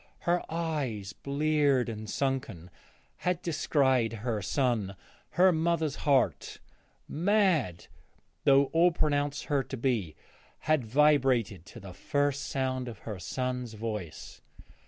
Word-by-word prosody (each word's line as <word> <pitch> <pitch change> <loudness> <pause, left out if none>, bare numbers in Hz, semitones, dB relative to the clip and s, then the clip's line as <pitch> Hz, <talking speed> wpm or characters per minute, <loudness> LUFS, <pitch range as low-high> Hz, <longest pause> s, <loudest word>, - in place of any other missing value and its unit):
Her 175 +1 +1
eyes, 140 -11 -3
bleared 145 -2 +1
and 110 -2 -6
sunken, 115 - -3 0.5
had 180 -1 -1
descried 135 -7 +1
her 110 -4 -1
son; 110 -3 0 0.4
her 185 +2 +5
mother's 160 -2 0
heart, 135 -4 +1 0.5
mad 170 - +1 0.6
though 140 0 +6
all 170 +2 +5
pronounced 145 -3 0
her 145 -2 0
to 135 0 -7
be, 115 - -1 0.5
had 155 -4 +1
vibrated 125 - +2
to - - -11
the 95 -1 -10
first 145 +8 -1
sound 130 -1 -2
of 115 -3 -7
her 105 -4 -5
son's 125 +3 -3
voice. 105 -7 -6
135 Hz, 115 wpm, -29 LUFS, 115-150 Hz, 0.6 s, though